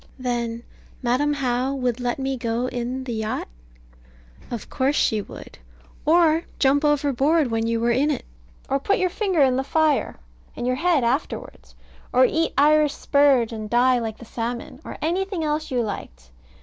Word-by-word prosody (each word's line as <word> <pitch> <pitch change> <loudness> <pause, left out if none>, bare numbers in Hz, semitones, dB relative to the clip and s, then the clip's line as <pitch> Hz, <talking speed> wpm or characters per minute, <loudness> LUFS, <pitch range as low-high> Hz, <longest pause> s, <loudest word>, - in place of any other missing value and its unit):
Then 235 -2 -3 0.4
Madam 255 +5 +2
How 260 -1 -1
would 250 -2 -1
let 245 -1 -1
me 270 0 -2
go 235 0 -2
in 250 +1 -3
the 250 -2 -4
yacht? 220 -1 -3 1.0
Of 235 -3 -6
course 275 +2 0
she 215 -7 +2
would, - - -12 0.5
or 330 0 +4
jump 280 +2 +3
overboard 295 0 +2
when 225 0 0
you 230 0 0
were 235 +1 +2
in 270 +5 +2
it; 290 - -2 0.4
or 275 +1 0
put 400 +9 +1
your 370 -2 0
finger 375 -5 0
in 260 -1 +3
the 265 - 0
fire, 310 0 +1 0.4
and - - -4
your 255 0 0
head 330 -3 +2
afterwards; 255 +6 -3 0.4
or 255 +1 +5
eat 325 +5 0
Irish 300 +1 +4
spurge, 275 -5 +3
and 215 -1 -6
die 245 +2 +4
like 225 -2 -4
the 235 - -12
salmon; 235 +4 -5
or - - -8
anything 370 +1 -1
else 305 0 -1
you 250 -3 0
liked. 60 - -7
260 Hz, 170 wpm, -23 LUFS, 240-295 Hz, 1.0 s, or